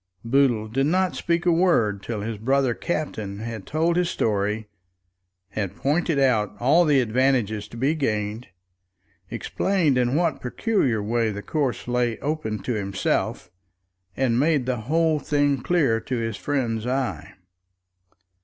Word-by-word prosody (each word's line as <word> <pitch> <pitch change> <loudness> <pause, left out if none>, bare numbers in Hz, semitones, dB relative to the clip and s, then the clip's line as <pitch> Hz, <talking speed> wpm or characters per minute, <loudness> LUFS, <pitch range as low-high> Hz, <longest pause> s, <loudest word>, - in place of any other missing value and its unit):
Boodle 120 -3 +2
did 135 +5 0
not 185 +2 +1
speak 170 +1 -1
a 175 - +4
word 140 - +2
till 105 0 -4
his 110 0 -4
brother 135 +2 +2
captain 110 - -3
had 110 -2 -6
told 165 +3 +1
his 180 -1 +1
story, 105 0 -1 0.8
had 100 -1 -4
pointed 155 - 0
out 125 -7 +2
all 150 +8 +4
the 145 -3 +4
advantages 120 -3 +1
to 115 - -11
be 135 +6 +2
gained, 110 -6 -2 0.8
explained 170 -9 0
in 125 +2 +1
what 165 -2 +1
peculiar 125 - 0
way 115 +1 +1
the 100 -1 -5
course 140 -7 -2
lay 120 -2 0
open 145 -8 -2
to 125 - -1
himself, 100 -3 -2 0.7
and 125 -3 +2
made 145 -3 +2
the 130 -1 -1
whole 160 -1 +2
thing 145 -2 +1
clear 140 -7 +2
to 125 +3 -3
his 115 -2 -2
friend's 120 -3 -2
eye. 130 0 -2
125 Hz, 145 wpm, -24 LUFS, 110-150 Hz, 0.8 s, a